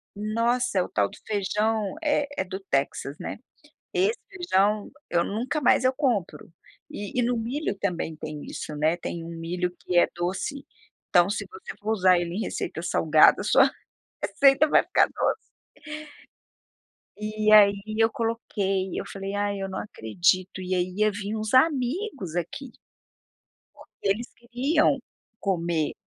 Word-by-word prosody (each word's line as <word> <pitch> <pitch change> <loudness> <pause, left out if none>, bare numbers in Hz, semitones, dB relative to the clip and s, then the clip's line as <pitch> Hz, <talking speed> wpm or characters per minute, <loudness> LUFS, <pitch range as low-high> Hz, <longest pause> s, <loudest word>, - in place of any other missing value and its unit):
Nossa, 230 +2 0
é - - +3
o - - -8
tal 100 -1 +1
do - - -13
feijão, 210 +1 0
eh, 290 -1 +1
é - - +1
do 190 +1 -6
Texas, 140 -4 -2
né. - - -5 0.5
Esse 425 +6 +1
feijão, 210 - +1 0.2
eu 170 -1 +2
nunca 245 +8 -2
mais 255 -2 +4
eu 255 - +4
compro. 255 - -1 0.4
E 205 +4 -4
e - - +3
no 245 +1 +1
milho, 235 +2 -2
também, 175 -4 -2
tem 150 -1 -7
isso, 150 - -6
né. 155 +3 +2
Tem 170 -1 -5
um 165 - -8
milho 180 +2 -2
que 180 - -1
é 175 - +6
doce, 185 +11 -3 0.4
então, 175 0 +5
se 205 - -2
você 445 +1 -9
for 215 +1 -2
usar 185 -4 +4
ele 175 +1 -3
em - - -2
receita - - -4
salgada, - - +5
sua - - +5 0.6
receita 275 +2 +4
vai - - +5
ficar - - +3
doce. - - -1 1.8
E, 215 0 0
aí, 200 -1 +7 0.2
eu 225 0 +5
coloquei. 205 -5 -1
Eu - - -5
falei: 195 0 -5
"Ai, 205 -1 -1
eu 195 - -3
não - - -5
acredito.". 180 - 0
E 185 0 -3
aí, 180 0 0
ia 215 0 +3
vim 205 +1 -4
uns 215 -1 -3
amigos 265 - +1
aqui, 180 - -4 1.1
porque - - -6
eles 220 +5 0
queriam 270 +5 +1 0.4
comer 170 -5 0
205 Hz, 155 wpm, -26 LUFS, 180-245 Hz, 1.8 s, aí